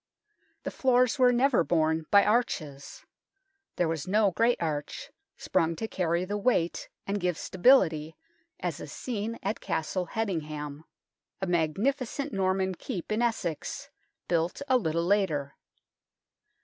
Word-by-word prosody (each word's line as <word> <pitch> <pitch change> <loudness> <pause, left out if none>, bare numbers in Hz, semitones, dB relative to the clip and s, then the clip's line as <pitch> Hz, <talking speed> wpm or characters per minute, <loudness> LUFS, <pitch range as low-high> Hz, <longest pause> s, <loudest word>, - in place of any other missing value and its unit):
The - - -3
floors 255 0 +2
were 250 -1 +6
never 245 -4 +3
borne 160 -1 +1
by 200 0 +6
arches. 155 - -1 0.7
There 175 - +1
was 160 -1 -3
no 205 +1 +3
great 230 +6 +2
arch, 150 -3 -4 0.3
sprung 165 0 0
to 225 - -4
carry 175 -3 0
the 205 +2 -3
weight 195 -7 0 0.2
and 200 +1 -1
give 180 -3 0
stability, 165 - +3 0.4
as - - -3
is - - -8
seen 230 -2 -4
at 200 +3 -2
Castle 175 +3 -2
Hedingham, 155 -8 -4 0.5
a 190 - -1
magnificent 240 - -1
Norman 190 0 +1
keep 175 +1 -6
in 215 +2 +1
Essex, 205 -9 -2 0.4
built 170 +8 0
a 260 - +3
little 170 -7 +1
later. 165 -8 +1
185 Hz, 130 wpm, -28 LUFS, 160-225 Hz, 0.7 s, were